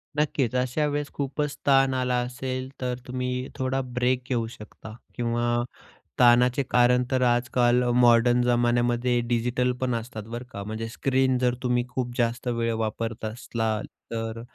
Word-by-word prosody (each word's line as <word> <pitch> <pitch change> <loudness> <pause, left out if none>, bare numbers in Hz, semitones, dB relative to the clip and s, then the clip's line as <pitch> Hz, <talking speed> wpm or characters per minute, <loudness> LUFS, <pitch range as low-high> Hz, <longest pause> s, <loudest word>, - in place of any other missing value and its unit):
नक्कीच, 140 -5 0
अशा 130 +4 0
वेळेस 145 0 -2
खूपच 145 +1 -2
ताण 135 -1 +5
आला 125 -1 0
असेल, 130 +1 -4
तर 125 -1 -1
तुम्ही 125 0 -3
थोडा 130 +1 -1
ब्रेक 125 +1 0
घेऊ 115 -3 0
शकता 110 -1 -11 0.2
किंवा 120 0 0 0.6
ताणाचे 125 +2 +5
कारण 125 0 +4
तर 130 -1 +2
आजकाल 120 0 +2
मॉडर्न 120 0 +5
जमान्यामध्ये 120 0 +2
डिजिटल 125 +1 +1
पण 130 -1 0
असतात, 115 -2 -5
बरं 120 +3 -7
का! 100 - -5
म्हणजे 110 +2 -5
स्क्रीन 130 +1 +1
जर 125 -1 +2
तुम्ही 125 -1 +1
खूप 125 -1 -3
जास्त 120 +1 -1
वेळ 115 -1 0
वापरत 110 0 -3
असला, 110 -1 -2 0.3
तर 115 0 -4
125 Hz, 145 wpm, -26 LUFS, 120-130 Hz, 0.6 s, ताण